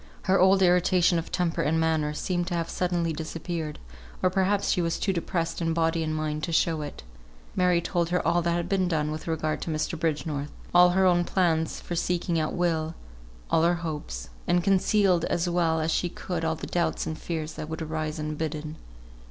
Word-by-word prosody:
Her 190 +1 +3
old 190 +1 +5
irritation 180 -1 +4
of 165 - -7
temper 175 -3 0
and 160 +2 +1
manner 160 -2 +1
seemed 175 +2 -1
to 175 - -2
have 165 -1 -2
suddenly 175 -2 0
disappeared, 160 0 -4 0.5
or 185 - +4
perhaps 195 +1 +1
she 180 - +2
was 165 -1 0
too 195 - 0
depressed 170 -1 -2
in 165 -1 0
body 165 0 +1
and 155 -1 -1
mind 155 0 -2
to 170 - -5
show 160 -1 +2
it. 145 - -7 0.5
Mary 180 -1 +3
told 170 -1 -1
her 180 0 0
all 170 +1 +3
that 170 0 0
had 170 0 -1
been 190 -1 +1
done 155 -3 0
with 155 +2 -6
regard 155 -1 -1
to - - -4
Mr. 155 +1 -2
Bridgenorth; 150 -3 -1 0.2
all 180 0 +7
her 190 - +5
own 175 -1 +4
plans 165 -3 +1
for - - -6
seeking 175 -1 0
out 155 - -1
Will; 165 -2 0 0.6
all 160 - +4
her 170 +1 +3
hopes; 150 - -5 0.2
and 175 0 +3
concealed 195 -2 +3
as 175 +1 0
well 170 -2 +1
as 160 +1 0
she 175 - 0
could 175 -1 -4
all 160 0 +1
the - - -7
doubts 175 -1 -1
and 155 - -3
fears 160 -1 -4
that 155 - -7
would 160 0 -4
arise 155 0 -3
unbidden. 155 0 -4
165 Hz, 200 wpm, -27 LUFS, 155-175 Hz, 0.6 s, all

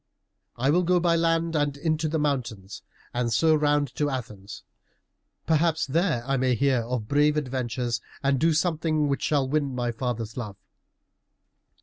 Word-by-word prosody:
"I 130 +4 +1
will 175 +4 +3
go 180 0 +2
by 170 -1 +2
land 165 0 +1
and 145 -2 0
into 155 +1 -1
the 160 - -1
mountains, 120 -10 -3 0.3
and 120 -1 -1
so 160 +8 +3
round 145 -3 +1
to 145 -1 0
Athens. 105 -6 -7 0.8
Perhaps 160 0 +2
there 155 -3 0
I 135 0 0
may 130 -1 +2
hear 130 0 +2
of 115 -2 -4
brave 150 +3 +3
adventures, 125 -4 -2 0.2
and 135 -1 +2
do 165 +2 +3
something 155 -2 +1
which 140 - -1
shall 140 -3 +1
win 140 -2 -1
my 120 -1 -1
father's 115 -2 -4
love." 105 -5 -6
140 Hz, 155 wpm, -26 LUFS, 125-155 Hz, 0.8 s, will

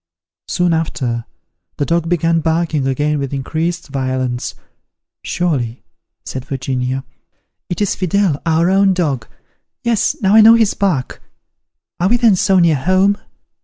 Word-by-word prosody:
Soon 175 -1 +1
after, 125 -7 -2 0.5
the 145 - 0
dog 165 +1 0
began 165 -1 +2
barking 160 -3 0
again 145 +3 0
with 140 0 -3
increased 165 +4 -3
violence. 130 -2 -2 0.7
"Surely," 135 -10 -2 0.4
said 130 - -5
Virginia, 130 -1 -3 0.7
"it 175 - -3
is 205 - +1
Fidele, 185 -4 0
our 165 +2 +2
own 195 0 +3
dog: 145 -10 -1 0.6
yes, 235 -3 +1
now 195 0 +2
I 220 - +8
know 225 +1 +8
his 225 -3 +2
bark. 175 -11 -1 0.8
Are 180 +2 +2
we 240 - +3
then 230 -4 +4
so 190 +1 +2
near 170 -4 +4
home? 185 +7 +2
165 Hz, 135 wpm, -17 LUFS, 135-185 Hz, 0.8 s, I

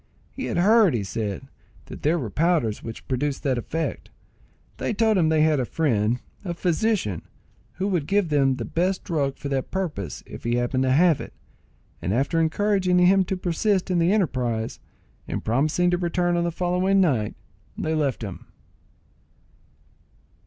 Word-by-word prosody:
He 265 - -5
had - - -2
heard, 205 - +5
he 110 - -1
said, 100 -1 -4 0.4
that - - -10
there 160 +4 +2
were 120 -10 -4
powders 155 - +1
which 115 -1 -8
produced 140 +2 -2
that 130 -4 +1
effect. 160 +6 -4 0.7
They 225 - -2
told 220 0 +3
him 165 -4 +3
they 155 -1 +3
had 155 -2 +3
a - - +1
friend, 120 -5 0 0.2
a 175 -3 -4
physician, 175 - 0 0.5
who 190 - -2
would 170 -7 -1
give 200 -3 +1
them 135 -3 +3
the 120 -3 -5
best 185 - -1
drug 145 -6 -1
for 145 - -6
that 135 -2 -2
purpose 150 - -4
if - - -10
he 120 +1 0
happened 120 +2 0
to 130 - +2
have 160 +2 +4
it; - - -9 0.7
and 95 +5 -1
after 140 +6 +1
encouraging 185 +2 +2
him 185 +2 +5
to 190 - -2
persist 185 +2 0
in 175 - +2
the 170 +2 +3
enterprise, 125 - -1 0.5
and - - -4
promising 155 +10 +2
to 175 - +1
return 175 0 0
on 170 0 +1
the 170 - 0
following 180 +3 +1
night, 130 - +1 0.4
they 160 - -1
left 145 -6 0
him. 100 -4 -7
160 Hz, 170 wpm, -24 LUFS, 130-180 Hz, 0.7 s, heard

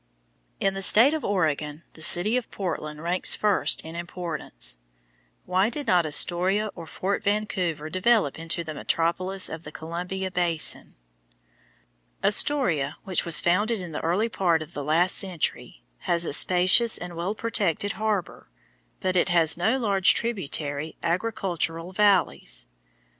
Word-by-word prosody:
In 195 -1 0
the 195 - -5
state 230 +9 +6
of 315 - -3
Oregon, 155 -5 -2
the 160 - -14
city 180 +8 +4
of 250 -2 -2
Portland 155 -5 -5
ranks 175 +2 +2
first 210 -2 +1
in 160 +1 -10
importance. 165 - -5 0.7
Why 185 +4 +1
did 285 +4 -4
not 180 -7 +2
Astoria 185 +7 +1
or 170 -2 -10
Fort 190 +6 -3
Vancouver 185 -7 -2
develop 185 - +1
into 165 +1 -3
the 155 -1 -7
metropolis 185 +5 -1
of 160 0 -8
the 150 - -10
Columbia 180 +4 -5
basin? 170 -3 +1 1.3
Astoria, 195 - +2
which 185 -2 -1
was 170 -2 +5
founded 210 +6 +1
in 180 -2 -7
the 150 - -5
early 180 +7 0
part 175 -8 0
of 155 +2 -16
the 145 - -5
last 165 +5 +2
century, 185 -5 -4 0.2
has 170 0 0
a - - -3
spacious 185 +8 +5
and 175 -1 -8
well 175 +5 -3
protected 205 -4 -1
harbor, 210 -3 -4 0.5
but 185 -1 -1
it 180 - +2
has 165 -3 +4
no 220 +9 0
large 200 -6 +3
tributary 155 -9 -3
agricultural 175 -2 -2
valleys. 195 - +1
180 Hz, 140 wpm, -25 LUFS, 165-200 Hz, 1.3 s, state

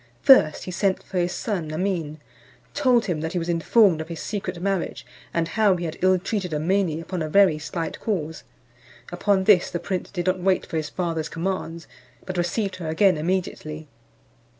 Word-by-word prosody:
First, 165 - +6
he 185 - -6
sent 190 +1 0
for 185 - -3
his 175 0 0
son 180 -9 -3
Amin, 160 -3 -2 0.5
told 255 -5 +3
him 170 -6 -2
that 160 +1 -3
he - - -1
was 170 0 -2
informed 170 +1 +3
of 160 - -7
his 170 -1 -7
secret 190 -4 -4
marriage, 195 -1 -2 0.3
and 165 -1 -1
how 210 -4 +3
he 175 -1 -4
had 160 -1 -5
ill 185 0 +4
treated 185 -3 -3
Amene 165 +1 0
upon 175 +1 -5
a 155 - -2
very 185 -3 +4
slight 165 +2 -4
cause. 160 -7 -3 0.7
Upon 190 +2 +1
this 190 -3 +5
the - - -3
prince 180 +1 -4
did 175 -3 -4
not 185 0 +1
wait 185 +1 +1
for 165 - -4
his 155 -2 -3
father's 165 -3 -2
commands, 170 -2 -4 0.4
but 185 - -5
received 185 +3 -1
her 170 -3 -6
again 180 +3 +4
immediately. 155 -2 -3
180 Hz, 185 wpm, -24 LUFS, 165-195 Hz, 0.7 s, First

